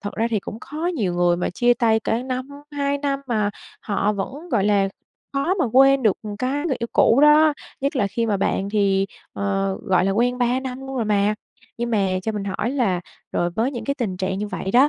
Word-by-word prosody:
thật 205 - -5
ra 225 - +1
thì 215 -3 +1
cũng 220 +4 -8
khó 310 +4 -5
nhiều 195 - -1
người 175 0 +3
mà 175 - -1
chia 240 +6 +3
tay 225 -2 +2
cả 225 +3 -1
năm, 255 +1 -4 0.2
2 285 0 0
năm 280 -1 -1
mà 215 -4 0 0.3
họ 205 0 0
vẫn, 275 - -5
gọi 220 -7 +2
là, 200 -1 +3 0.4
khó 280 +7 +1
mà 365 - +1
quên 270 +1 +6
được, 215 -5 +3
ừm, 205 -1 -6
cái 275 +7 -1
người 270 - 0
yêu 235 - -2
cũ 235 +4 +5
đó, 300 +1 +7 0.3
nhất 275 +1 -1
là 205 - +2
khi 230 +3 -1
mà 210 -3 +1
bạn 195 0 0
thì, 195 -2 +2 0.3
ờ, 195 -1 -1
gọi 185 -1 +2
là, 195 - +2
quen 245 +4 +1
3 245 +1 +1
năm 260 0 -5
luôn 270 0 -6
rồi 230 - 0
mà. 210 0 +2 0.4
Nhưng 240 0 -2
mà 200 -3 +2 0.2
cho 220 - -2
mình 205 -2 -3
hỏi 200 +4 -2
là 230 -10 +1 0.3
rồi 175 - 0
với 225 +9 0
những 235 -3 -5
cái 280 - -1
tình 215 -9 -3
trạng 190 +1 -2
như 210 - -2
vậy 190 - -4
đó 255 +7 +6
225 Hz, 240 wpm, -22 LUFS, 200-265 Hz, 0.4 s, đó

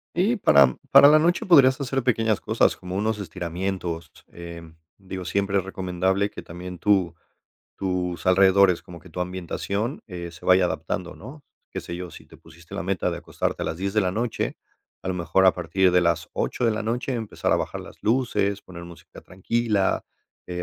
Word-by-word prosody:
Y 195 +8 +2
para, 70 - +6
mm, 65 - -3
para 140 - +9
la 155 +1 +7
noche 175 +3 +1
podrías 140 -6 +6
hacer 135 -1 -2
pequeñas 115 -3 +1
cosas, 110 +1 +2
como 90 0 -7
unos 110 +1 0
estiramientos, 85 -2 -4 0.2
em, 85 -1 -10 0.2
digo, 95 -1 -7
siempre 100 +2 0
es 95 - +1
recomendable 95 +1 -1
que - - -9
también 90 +1 -9
tu 95 -4 +2 0.6
tus 90 -2 -2
alrededores, 95 -1 +5
como 85 -1 -12
que 90 - -16
tu 80 - -9
ambientación, 95 - -3
eh, 85 -3 -7
se 85 - -15
vaya 90 0 +5
adaptando, 90 0 -4
¿no? 145 +3 -11 0.3
Qué - - -4
sé 85 - -7
yo, 90 -1 -7
si - - -13
te - - -16
pusiste 85 0 -15
la - - -3
meta 95 -1 -1
de - - -4
acostarte - - -3
a - - -1
las - - -3
10 95 +3 -3
de 110 - +2
la 90 -2 0
noche, 115 +3 -2 0.5
a - - -5
lo 95 - -1
mejor 90 +2 +2
a 95 - +7
partir 90 +2 +1
de 90 0 +4
las 85 -1 0
8 - - -2
de 115 - +4
la 110 0 -2
noche 120 +4 -2
empezar 110 -3 -2
a - - +4
bajar - - -4
las - - -12
luces, 105 -4 0
poner 85 -2 -10
música 85 -1 -13
tranquila, 105 +2 -1 0.4
eh, 90 0 -4
95 Hz, 200 wpm, -24 LUFS, 90-110 Hz, 0.6 s, para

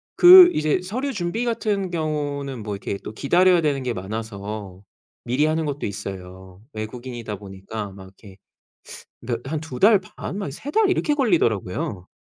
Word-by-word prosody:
그 360 0 +10
이제 155 +3 +1
서류 255 +10 -3
준비 205 +5 -2
같은 210 -5 -1
경우는 145 -6 -3
뭐 105 -1 -4
이렇게 100 0 -4
또 - - -6
기다려야 175 +8 +3
되는 145 -4 0
게 125 -1 -2
많아서 100 -1 -6 0.4
미리 130 +5 +1
하는 160 +1 0
것도 145 -1 -3
있어요. 95 -1 -8
외국인이다 115 -1 -6
보니까 100 +1 -7
막 95 0 -12
이렇게 95 0 -16 0.9
그러니까 120 +2 -4
한 160 - -1
2 145 -6 -7
달 210 0 +6
반 185 +1 -8
막 195 -9 -4
3 215 - -8
달 435 0 +3
이렇게 340 -5 +1
걸리더라고요. 110 - 0
130 Hz, 325 characters per minute, -23 LUFS, -, 0.9 s, 그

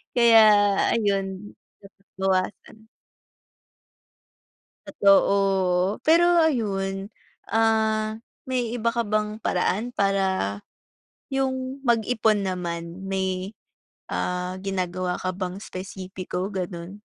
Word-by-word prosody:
Kaya 230 -2 +7 0.5
ayun, 200 -2 -2 0.2
dapat 195 0 -19
bawasan. 195 +3 -2 2.0
Totoo. 195 -1 +3
Pero 345 +2 +5
ayun, 195 -7 -1 0.4
ah, 220 0 +1 0.2
may 250 -3 -1
iba 230 0 -1
ka 235 - 0
bang 215 0 -2
paraan 190 +6 0
para, 190 - 0 0.7
yung 265 0 -2
mag 230 -2 +3
ipon 215 -3 +1
naman. 170 -1 -4
May, 190 +1 -2 0.6
ah, 180 +1 -2
ginagawa 185 -2 -2
ka 185 - -2
bang 185 -1 -4
espesipiko, 185 0 -6
ganun? 180 -2 -5
195 Hz, 90 wpm, -24 LUFS, 185-220 Hz, 2.0 s, Kaya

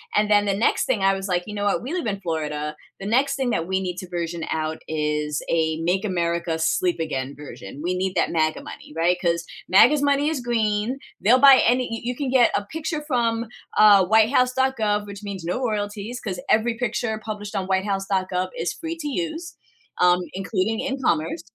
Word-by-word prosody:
And 210 0 +2
then 205 -1 +4
the 200 - +1
next 215 - +1
thing 240 -6 0
I 195 0 +4
was 195 0 -5
like, 180 -2 0
"You 210 - -6
know 205 0 -2
what? 205 - +1
We 260 - -5
live 360 -7 -2
in 200 -2 -2
Florida. 150 -3 -3 0.2
The 195 - -7
next 270 +5 +2
thing 265 -2 -1
that 165 -6 -1
we 190 0 0
need 180 -2 -4
to 185 - -7
version 170 -1 -3
out 155 0 -2
is 150 -1 -1
a 160 -1 +1
'make 180 +4 0
America 170 -3 -1
sleep 170 +2 +1
again' 140 -4 -3
version." 140 -3 -10
We 180 +1 -1
need 190 0 -1
that - - +1
MAGA 155 -1 0
money, - - -11
right? 175 +2 +2
'Cause 170 -1 0 0.2
MAGA's 250 +11 +6
money 285 +1 +2
is 310 -5 -2
green. 225 0 0 0.2
They'll 245 +5 +5
buy 275 0 +9
any 250 +2 +2
y 230 - -3
you 245 +1 -2
can 275 0 -3
get 250 -2 +4
a 200 - -1
picture 315 - -4
from, 235 -4 0 0.3
uh, 215 -1 +8
whitehouse.gov, 225 0 +2
which 200 0 -9
means 200 -3 -6
no 180 +9 -2
royalties 210 +1 -3
'cause 190 -5 -4
every 230 +1 +2
picture 235 -2 -1
published 210 -2 -6
on 195 - -1
whitehouse.gov 190 -1 -1
is 170 - -2
free 330 0 -6
to 305 -2 -5
use, 330 +3 -4 0.5
um, 180 0 +5
including 195 +3 -1
in 270 0 -2
commerce 165 -2 0
205 Hz, 200 wpm, -23 LUFS, 175-240 Hz, 0.5 s, buy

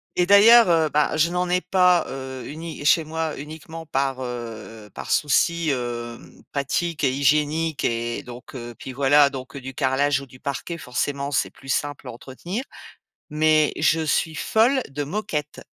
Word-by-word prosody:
et 180 - +2
d'ailleurs, 210 +2 +7
heu, 160 -2 +3
bah, 150 +1 +1
je 160 +2 +3
n'en 180 0 -1
ai 180 +1 +2
pas, 180 -3 +3
heu, 130 -1 -6
uni 160 0 -7
chez 160 +2 +5
moi, 160 0 -3
uniquement, 160 +2 -9
par, 135 -2 -1
heu 115 -3 -7
par - - -7
souci, 165 +3 +2
hem, 120 -2 -5
pratique 150 +3 -2
et 130 - +2
hygiénique 150 +3 +1
et 115 0 -2
donc 125 +2 -11
heu, 120 -1 -7
puis 130 - -8
voilà, 140 +2 +4
donc 135 0 -8
du 135 0 -7
carrelage 135 +1 +1
ou 140 - -9
du 125 -1 -17
parquet, 145 +4 -4
forcément, 140 +1 -3
c'est - - 0
plus 135 - -15
simple 145 +1 -2
à - - -5
entretenir, 170 - -6 0.7
mais 155 0 +3
je 165 0 +2
suis 160 +1 0
folle 245 - +2
de 145 +2 -3
moquette. 185 -3 -4
145 Hz, 165 wpm, -23 LUFS, 130-165 Hz, 0.7 s, d'ailleurs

